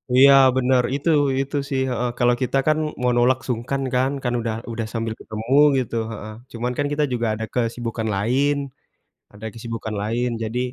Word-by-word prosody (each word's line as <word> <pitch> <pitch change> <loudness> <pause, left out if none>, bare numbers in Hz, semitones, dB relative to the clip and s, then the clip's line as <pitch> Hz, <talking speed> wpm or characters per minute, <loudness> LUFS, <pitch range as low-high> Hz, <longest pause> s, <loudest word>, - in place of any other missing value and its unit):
Iya 140 +2 +8 0.2
bener 130 0 +3
itu 145 +4 -1 0.3
itu 135 +2 -3
sih, 135 -1 0
heeh. 125 0 -1
Kalau 120 0 +3
kita 130 +1 0
kan 155 0 +4 0.2
mau 125 0 +2
nolak 130 +2 +3
sungkan 125 +3 -2
kan, 130 +2 +2
kan 125 -1 0
udah 115 -1 -2 0.2
udah 115 -1 -3
sambil 115 -1 -2
ketemu 110 +4 -4 0.2
gitu, 125 -2 -2 0.2
heeh. 110 0 -7 0.2
Cuman 120 +1 -3
kan 145 - 0
kita 150 0 +1
juga 120 -1 0
ada 110 - -3
kesibukan 115 -2 -2
lain 130 +8 +1 0.8
ada 105 +2 -9
kesibukan 115 -1 -5
lain. 120 +3 -1
Jadi, 110 +2 -3
120 Hz, 175 wpm, -22 LUFS, 115-130 Hz, 0.8 s, Iya